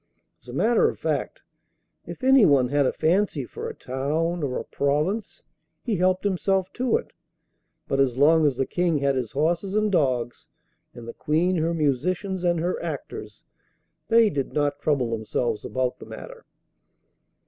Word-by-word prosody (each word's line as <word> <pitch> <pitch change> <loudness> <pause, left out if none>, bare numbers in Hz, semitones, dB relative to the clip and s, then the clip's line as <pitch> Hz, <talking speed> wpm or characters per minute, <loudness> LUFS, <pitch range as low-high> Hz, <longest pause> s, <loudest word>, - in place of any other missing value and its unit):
As 115 - -24
a 120 - -8
matter 225 - +3
of - - -7
fact, - - -3 0.6
if - - -9
anyone 195 - +5
had 145 -1 +2
a - - +1
fancy 170 -5 +1
for - - -6
a - - -8
town, 155 +7 -2
or 135 -4 -2
a - - -4
province, 150 +10 -1 0.4
he 225 -5 -1
helped 185 +1 +2
himself 190 -1 0
to 255 - +1
it; 485 - -10 0.7
but 135 - -1
as 130 -3 +2
long 155 +2 +5
as 135 -4 -1
the 135 - +1
King 175 0 0
had 140 -1 +1
his 125 -5 -3
horses 170 +7 0
and 215 -1 +2
dogs, 130 -8 0 0.5
and 120 -1 -10
the 115 - -6
Queen 175 +4 0
her 165 +1 0
musicians 175 +6 -1
and 175 -1 +2
her 175 +3 -2
actors, - - -7 0.6
they 230 -1 +5
did 140 -2 -3
not 145 -1 0
trouble 135 -6 0
themselves 110 0 -2
about 130 -1 -2
the - - -11
matter. - - -10
160 Hz, 165 wpm, -25 LUFS, 135-185 Hz, 0.7 s, anyone